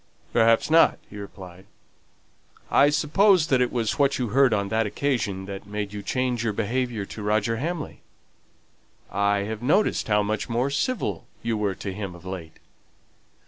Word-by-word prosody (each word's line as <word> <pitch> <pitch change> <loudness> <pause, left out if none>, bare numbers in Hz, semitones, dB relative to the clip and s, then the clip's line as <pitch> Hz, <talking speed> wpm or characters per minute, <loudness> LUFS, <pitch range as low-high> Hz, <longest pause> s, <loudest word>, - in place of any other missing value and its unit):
"Perhaps 115 +4 +3
not," 165 +1 +5
he 105 - -9
replied. 95 -2 -10 1.0
"I 145 - +6
suppose 160 +5 +4
that 130 -4 +2
it 125 - +1
was 115 +2 -1
what 140 -1 +3
you 125 -3 -2
heard 135 +3 +4
on 100 -2 0
that 110 0 +1
occasion 105 -6 -1
that 100 0 -8
made 105 0 -4
you 105 - -5
change 125 +2 -1
your 110 -2 0
behaviour 115 0 -2
to 105 - -9
Roger 110 +2 0
Hamley? 155 +4 -4 1.1
I've 100 +2 0
noticed 155 - +2
how 105 -1 +3
much 105 +2 -2
more 120 +4 0
civil 255 - -2 0.2
you 115 -1 0
were 105 -3 -1
to 95 0 -5
him 95 -2 -6
of 85 +1 -14
late." 90 -4 -7
110 Hz, 160 wpm, -25 LUFS, 100-130 Hz, 1.1 s, I